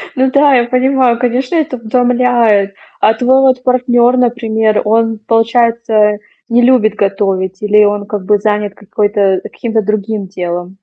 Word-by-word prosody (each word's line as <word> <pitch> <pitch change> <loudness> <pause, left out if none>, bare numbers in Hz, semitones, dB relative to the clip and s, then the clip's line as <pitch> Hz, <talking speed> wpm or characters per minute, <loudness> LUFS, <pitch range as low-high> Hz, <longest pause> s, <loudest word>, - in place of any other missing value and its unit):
Ну 260 0 +1
да, 280 0 +3
я 240 -1 +2
понимаю, 255 -1 +1
конечно, 250 +4 -2
это 310 -5 -1
утомляет. 235 -4 +1 0.2
А 220 - +3
твой 255 +4 +2
вот 260 -1 +1
партнёр, 250 -1 +2
например, 225 -3 0
он, 225 +1 0
получается, 225 -1 +1 0.3
не 240 +1 +2
любит 240 -4 +2
готовить 195 -2 -2
или 210 0 +3
он 205 0 -1
как 205 -2 -6
бы 210 +1 +2
занят 210 -1 -2
какой-то 205 -2 -1
каким-то 225 -2 -3
другим 210 -1 -3
делом? 175 -1 -5
225 Hz, 145 wpm, -12 LUFS, 205-250 Hz, 0.3 s, да